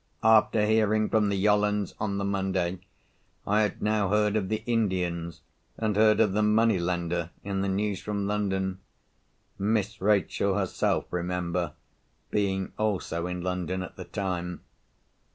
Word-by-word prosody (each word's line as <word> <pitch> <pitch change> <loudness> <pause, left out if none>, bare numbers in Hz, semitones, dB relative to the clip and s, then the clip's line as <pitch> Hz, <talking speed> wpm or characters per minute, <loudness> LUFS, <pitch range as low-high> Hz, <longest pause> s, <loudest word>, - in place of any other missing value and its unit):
After 110 -1 +5
hearing 110 0 +2
from 105 -2 +2
the 100 - 0
Yollands 105 0 +2
on 100 -2 -1
the 100 - -1
Monday, 95 -2 -1 0.7
I 105 +2 +3
had 105 -1 -1
now 105 -2 +1
heard 105 0 +2
of 100 -3 0
the 110 0 -2
Indians, 90 -8 -1 0.4
and 110 -2 0
heard 110 0 +5
of 105 -4 +3
the 105 - +2
money 105 -1 +3
lender, 85 -1 -1
in 95 -1 -2
the 100 - 0
news 100 0 -1
from 100 -1 -2
London—Miss 100 +1 -3
Rachel 100 -1 +2
herself 95 -3 0
remember, 90 0 -2 0.6
being 95 -2 0
also 95 -5 -1
in 90 0 -4
London 90 0 -2
at 95 - -9
the - - -8
time. 90 -3 -3
100 Hz, 140 wpm, -27 LUFS, 90-105 Hz, 0.7 s, After